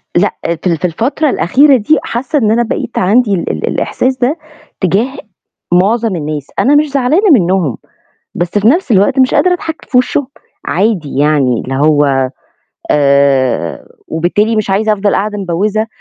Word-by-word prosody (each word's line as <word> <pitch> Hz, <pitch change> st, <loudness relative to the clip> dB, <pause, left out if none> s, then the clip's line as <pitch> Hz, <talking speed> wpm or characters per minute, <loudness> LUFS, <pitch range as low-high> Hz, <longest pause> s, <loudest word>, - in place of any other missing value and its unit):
لأ 185 Hz, +4 st, +1 dB, 0.3 s
في -, -, -1 dB
ال 170 Hz, -, 0 dB
في 180 Hz, -, -3 dB
الفترة 250 Hz, -, -1 dB
الأخيرة 275 Hz, -, +3 dB
دي 245 Hz, +8 st, +2 dB
حاسة 270 Hz, +5 st, -2 dB
إن 215 Hz, -3 st, +1 dB
أنا 235 Hz, +2 st, +2 dB
بقيت 230 Hz, +1 st, -4 dB
عندي 210 Hz, +3 st, +2 dB
ال 180 Hz, -, -2 dB
ال -, -, -4 dB
الإحساس 260 Hz, 0 st, -1 dB
ده 260 Hz, +5 st, 0 dB, 0.4 s
تجاه 210 Hz, -, 0 dB, 0.6 s
مُعظَم 210 Hz, +3 st, +1 dB
الناس، 150 Hz, -3 st, -4 dB
أنا 285 Hz, +3 st, +3 dB
مش 300 Hz, +1 st, +3 dB
زعلانة 280 Hz, -, +1 dB
منهم، 180 Hz, -, +2 dB, 0.6 s
بس 175 Hz, 0 st, -2 dB
في 205 Hz, +2 st, +2 dB
نَفْس 330 Hz, +4 st, +1 dB
الوقت 205 Hz, +7 st, +2 dB
مش 260 Hz, -1 st, +3 dB
قادرة 365 Hz, -1 st, +3 dB
أضحك 325 Hz, -2 st, -6 dB
في 250 Hz, -, +2 dB
وشهم، 255 Hz, +2 st, 0 dB, 0.4 s
عادي 180 Hz, -8 st, -1 dB
يعني 145 Hz, -5 st, +2 dB
اللي 135 Hz, -, -5 dB
هو 140 Hz, -4 st, +2 dB, 0.6 s
آآ، 140 Hz, -, +1 dB, 0.2 s
وبالتالي 205 Hz, +7 st, 0 dB
مش 215 Hz, -2 st, -1 dB
عايزة 215 Hz, +3 st, +1 dB
أفضَل 205 Hz, 0 st, 0 dB
قاعدة 210 Hz, +1 st, -2 dB
مبوِّزة، 200 Hz, +4 st, -1 dB
205 Hz, 160 wpm, -13 LUFS, 165-250 Hz, 0.6 s, الأخيرة